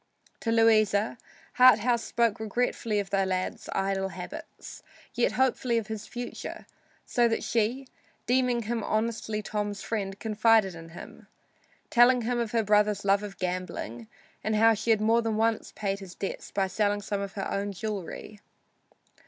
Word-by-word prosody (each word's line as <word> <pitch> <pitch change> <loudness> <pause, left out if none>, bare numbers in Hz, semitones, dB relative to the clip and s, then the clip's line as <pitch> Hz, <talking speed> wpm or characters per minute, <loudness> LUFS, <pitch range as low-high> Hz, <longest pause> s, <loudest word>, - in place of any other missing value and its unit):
To 230 - -1
Louisa, 220 -1 +3 0.4
Harthouse 245 -1 +6
spoke 230 -3 +1
regretfully 220 0 -1
of 200 -1 -4
the 195 -1 +2
lad's 185 -1 -3
idle 195 0 0
habits, 190 - -9 0.3
yet 240 - +1
hopefully 255 -2 +1
of 225 - -1
his 220 -1 -5
future, 245 0 -7 0.4
so 240 -1 +2
that 225 - -1
she, 235 +4 0 0.4
deeming 250 -1 +2
him 230 0 -2
honestly 215 -1 -1
Tom's 205 -1 -3
friend, 200 -3 -3
confided 220 -2 +3
in 165 0 -10
him, - - -11 0.6
telling 245 0 +5
him 240 +1 0
of 235 -2 -1
her 230 -1 +1
brother's 210 -1 +2
love 200 0 +4
of 205 -2 -7
gambling 180 - -4 0.4
and 215 0 0
how 225 +1 +6
she 220 +2 -4
had 220 -2 +4
more 225 +2 +3
than 225 -2 -1
once 225 0 0
paid 200 -2 -2
his 190 -2 -10
debts 195 - -5
by 195 -1 0
selling 205 +1 0
some 200 0 -2
of 200 -1 -5
her 195 - -3
own 200 +1 -2
jewelry. 205 0 -6
215 Hz, 160 wpm, -28 LUFS, 200-230 Hz, 0.6 s, Harthouse